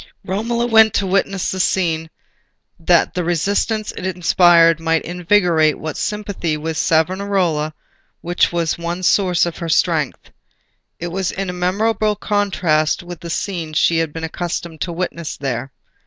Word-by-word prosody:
Romola 230 +5 -1
went 220 -2 +5
to 200 - +1
witness 195 0 0
the 190 - -4
scene, 165 -4 0 0.7
that 170 0 +3
the 180 - -2
resistance 200 +6 0
it - - -9
inspired 175 -2 +4
might 165 0 0
invigorate 175 -3 +2
that 155 -1 -4
sympathy 205 -7 -3
with 160 +1 -4
Savonarola 170 -1 +1 0.5
which 175 +1 +1
was 170 -1 -1
one 170 +2 -4
source 180 -2 +3
of 170 - -5
her 170 - -4
strength. 160 -3 0 0.7
It 175 - -4
was 185 +1 -2
in 180 -2 -4
memorable 210 +4 +1
contrast 185 -7 0
with 175 -2 -9
the 170 - -8
scene 170 -2 -3
she 165 +2 +2
had 165 -2 -1
been 165 +1 -7
accustomed 170 -1 -5
to 175 - -2
witness 170 -2 -4
there. 135 -1 -4
175 Hz, 145 wpm, -19 LUFS, 165-195 Hz, 0.7 s, went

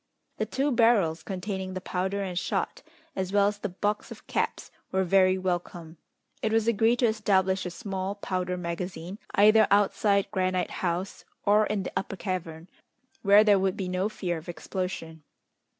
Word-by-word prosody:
The - - -1
two 280 +2 0
barrels, 220 -9 +3
containing 190 0 -4
the - - -2
powder 190 +2 -2
and 185 -2 -4
shot, 175 - -2 0.3
as 190 -1 -2
well 200 0 +4
as 205 0 -2
the 205 - -3
box 205 +3 -2
of - - -11
caps, - - -2 0.2
were 190 0 +2
very 185 0 +4
welcome. 175 -3 -4 0.4
It 220 - 0
was 225 0 +2
agreed 230 +1 +3
to - - +5
establish 190 -4 +1
a - - -3
small 195 +1 -4
powder 185 -2 -2
magazine, 175 +2 -5 0.2
either 215 +2 +6
outside 200 0 +2
Granite 185 -2 0
House 180 +2 -2 0.2
or 210 +1 +4
in 205 -2 -1
the - - -6
Upper 195 - -2
Cavern, 170 -3 -5 0.5
where 205 +1 +7
there 205 -2 +5
would 190 -1 0
be 190 - -3
no 185 +3 -1
fear 175 -5 -3
of 160 - -12
explosion. 175 -3 -5
190 Hz, 165 wpm, -27 LUFS, 180-205 Hz, 0.5 s, where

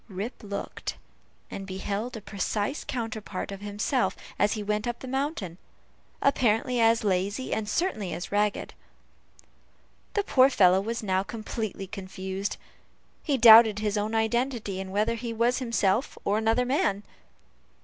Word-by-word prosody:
Rip 205 +6 -5
looked, 200 -1 -5 0.6
and 195 -1 -6
beheld 205 +5 -4
a - - -8
precise 205 +6 -2
counterpart 220 -6 -4
of 195 0 -7
himself 210 +6 0 0.2
as 205 - +3
he 215 - -4
went 210 +2 -1
up 240 0 -2
the 260 - -9
mountain; 260 - -3 0.6
apparently 250 -2 +2
as 225 0 +4
lazy, 200 +5 -1
and 215 -1 -2
certainly 215 - -1
as 175 - -5
ragged. 205 0 0 1.4
The 410 - +2
poor 265 -8 +5
fellow 190 -6 +5
was 230 +2 -3
now 190 -2 +1
completely 215 -1 -5
confounded. 190 0 -5 0.6
He 285 -4 0
doubted 225 -2 +9
his 210 0 -1
own 210 +2 -1
identity, 225 -3 0
and 190 0 -7
whether 210 +4 +1
he 230 0 -4
was 235 +3 +1
himself 230 -1 0
or 205 +2 +2
another 225 +3 +2
man. 210 -6 0
215 Hz, 140 wpm, -27 LUFS, 200-235 Hz, 1.4 s, doubted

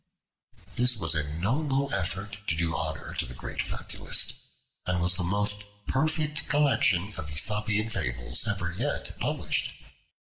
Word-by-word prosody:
This 125 -1 +4
was 85 -6 +2
a 75 -2 +1
noble 135 - +1
effort 95 +2 -2
to 80 - +2
do 80 0 0
honor - - -2
to - - -1
the 60 - -7
great - - -3
fabulist, - - 0 0.5
and 90 -1 +1
was 90 +1 +3
the 90 - -2
most 105 +3 +2 0.2
perfect 150 +1 0
collection 120 -9 +3
of 75 - -5
Aesopian 105 +7 +1
fables 65 - +1
ever 90 -5 -1
yet - - -1
published. - - +1
100 Hz, 140 wpm, -28 LUFS, 85-125 Hz, 0.5 s, This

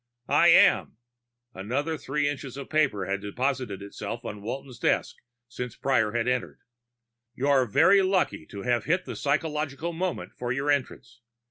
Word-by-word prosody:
"I - - +6
am." - - +5 0.6
Another 130 +12 -2
three 145 0 -1
inches 135 -2 -5
of 140 - -8
paper 140 -11 +1
had 100 +1 -2
deposited 120 -1 -2
itself 100 - -6
on 105 -1 -6
Walton's 125 +3 -6
desk - - 0 0.3
since 125 -1 -6
Prior 120 -6 +1
had 120 0 0
entered. 125 -1 -2 0.7
"You're 135 -1 +2
very 195 - +5
lucky 185 - 0
to 100 - -8
have 120 -1 0
hit 175 +4 +1
the - - -6
psychological 150 +2 -1
moment 180 +2 -3
for 120 -1 -4
your 135 +4 0
entrance. 130 -3 -3
130 Hz, 150 wpm, -27 LUFS, 120-145 Hz, 0.7 s, I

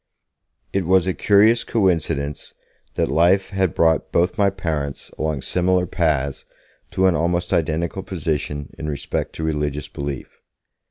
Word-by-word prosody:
It 95 -4 0
was 95 -1 +4
a 95 - 0
curious 105 +5 +4
coincidence 80 - -1 0.4
that - - +1
life 90 +6 +3
had 95 -4 0
brought 80 -1 +2
both 90 +2 +2
my 100 -3 +3
parents 80 -7 -4
along 75 -3 -2
similar 90 0 +1
paths 75 -6 0 0.5
to 95 - +1
an 95 - +5
almost 85 +1 0
identical 85 +4 0
position 75 -6 -3
in 75 - -3
respect 70 -2 -3
to 80 - -6
religious 75 -2 -2
belief. 70 -2 -6
85 Hz, 140 wpm, -21 LUFS, 75-95 Hz, 0.5 s, an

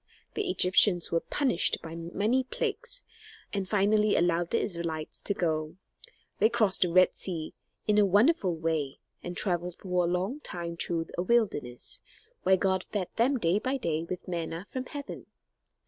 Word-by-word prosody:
The 410 -3 -2
Egyptians 180 - +4
were 165 - +3
punished 255 - +1
by 165 -1 -7
many 200 +10 0
plagues, 475 - -2 0.5
and 195 -2 -2
finally 210 +1 +3
allowed 175 0 +2
the 230 - +1
Israelites 170 -4 -3
to 200 - 0
go. 155 -2 -1 0.6
They 220 - +5
crossed 220 -5 +2
the 180 - +3
Red 185 +1 +5
Sea 165 -4 -3 0.3
in 210 0 +3
a 205 - +6
wonderful 205 - +3
way, 160 -4 -1 0.2
and 175 0 -6
traveled 175 -2 0
for 180 -2 -1
a - - +1
long 190 +11 -1
time 170 - -5
through 165 0 -2
a - - +3
wilderness, 185 - 0 0.4
where 190 0 +4
God 190 0 +1
fed 195 -4 -3
them 255 +4 +3
day 180 -2 +2
by 260 +4 -1
day 165 -9 -1
with 180 +2 -6
manna 170 0 -4
from 255 -1 -5
heaven. 285 -1 -7
185 Hz, 165 wpm, -29 LUFS, 170-220 Hz, 0.6 s, a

